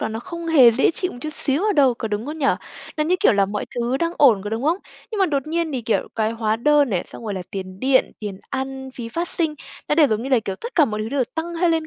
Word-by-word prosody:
đó - - -1
nó 220 0 -4
không 340 +4 -7
hề 275 -8 +7
dễ 255 +7 +3
chịu 365 +2 -3
một - - -10
chút 310 +2 -5
xíu 285 +3 0
ở 425 - +3
đâu, 275 -8 +4
có 225 - -4
đúng 210 +4 -3
không 310 +2 -5
nhỉ? 285 - +1 0.5
Nó 305 - +1
như, 360 +3 +2
kiểu, 420 - +5
là 200 -1 +3
mọi 205 +1 -3
thứ 240 +2 0
đang 335 +4 -1
ổn, 240 -9 +6
có 205 - -4
đúng 225 +3 -2
không? 325 +5 +2 0.3
Nhưng 435 - -4
mà 385 - +4
đột 280 -3 -1
nhiên 325 0 -1
thì, 260 - -2
kiểu, 225 - 0
cái 220 -1 0
hóa 220 -1 0
đơn 290 +1 +3
này, 180 -3 -1
xong - - -9
rồi 210 -3 -3
là 185 - -4
tiền 185 -1 -7
điện, 260 0 +3
tiền 205 -3 -6
ăn, 265 0 -4
phí 235 -2 -6
phát 335 +8 -2
sinh 320 -3 -1 0.3
nó - - +3
đều 300 -2 +6
giống 215 -2 -1
như 265 - -4
là, 255 -4 +3
kiểu, 195 -3 -4
tất 470 - -8
cả 310 - +6
mọi 215 -4 -3
thứ 215 - -4
đều 270 0 0
tăng 335 +1 -3
hơi 340 0 +2
lên 320 -1 0
265 Hz, 305 wpm, -22 LUFS, 225-320 Hz, 0.5 s, hề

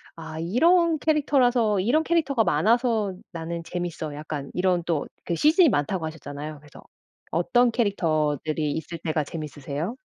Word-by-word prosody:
'아 160 -1 -8
이런 330 - +3
캐릭터라서 255 -9 +2
이런 245 +12 +2
캐릭터가 305 -8 +2
많아서 220 - +2 0.2
나는 170 -1 -5
재미있어.' 170 -3 -4
약간 150 -2 -6
이런 180 -1 +1
또 165 -4 -1 0.2
그 170 - -1
시즌이 315 - +5
많다고 160 - -1
하셨잖아요. 150 -1 -7
그래서 145 -1 -15 0.5
어떤 235 +9 +3
캐릭터들이 155 - 0
있을 160 +2 -5
때가 155 -1 -1
재밌으세요? 150 - -5
175 Hz, 350 characters per minute, -25 LUFS, 155-240 Hz, 0.5 s, 시즌이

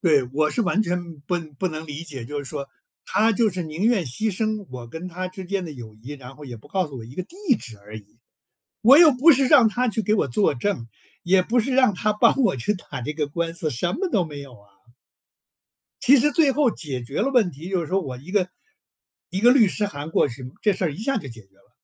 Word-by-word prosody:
对， 150 -6 +4
我 155 +1 +1
是 240 - -1
完 200 +3 +1
全 175 -3 -4
不 175 +5 -2 0.2
不 185 - 0
能 155 -1 -6
理 150 +1 -6
解， 140 -7 -7
就 145 +5 -5
是 145 - -5
说 140 0 -6 0.4
他 220 +2 +2
就 225 +1 +2
是 185 -2 -3
宁 160 +4 -4
愿 225 -6 +3
牺 190 - -2
牲 215 0 -2
我 125 -2 -8
跟 160 +8 -7
他 185 +1 -5
之 185 0 -9
间 190 0 -2
的 160 - -7
友 115 -6 -10
谊， 120 +7 -10
然 135 -2 -11
后 150 - -11
也 125 -3 -8
不 115 - -17
告 185 +2 0
诉 140 -4 -9
我 115 - -8
一 120 +4 -12
个 185 - -3
地 345 - -16 0.2
址 110 -4 -10
而 105 +2 -11
已。 105 +1 -14 0.6
我 265 +6 +8
又 330 -2 +9
不 275 +6 +6
是 270 -1 +3
让 255 -5 +6
他 245 +3 0
去 220 0 -1
给 215 0 +1
我 195 - +1
作 145 +5 +2
证， 125 - -2 0.4
也 185 +1 +4
不 235 +6 0
是 255 +3 -2
让 255 -7 +4
他 215 +4 0
帮 230 +4 +4
我 230 - +2
去 130 - 0
打 180 - -8
这 135 +5 -4
个 150 -1 -2
官 165 +3 -3
司， 160 -2 -2
什 175 +8 -1
么 375 +1 -2
都 195 - +2
没 145 -3 -8
有 140 -2 -11
啊。 100 0 -25 1.3
其 275 +3 +6
实 290 +3 +3
最 300 -2 +4
后 275 -2 +2
解 140 - -5
决 130 +4 -4
了 260 +6 +1
问 235 -9 +3
题， 160 +5 -10
就 190 -2 0
是 165 - -4
说 190 +4 0
我 135 -8 -6
一 140 +8 -12
个 190 -3 +2 0.8
一 190 - -3
个 240 +3 +7
律 230 -7 +5
师 205 +2 -1
函 150 -5 -7
过 - - +3
去， 125 0 -8
这 210 - +3
事 185 - -3
儿 160 - 0
一 - - -10
下 270 +6 -1
就 140 - -8
解 115 -2 -10
决 95 0 -34
了。 100 - -29
175 Hz, 280 characters per minute, -23 LUFS, 140-215 Hz, 1.3 s, 又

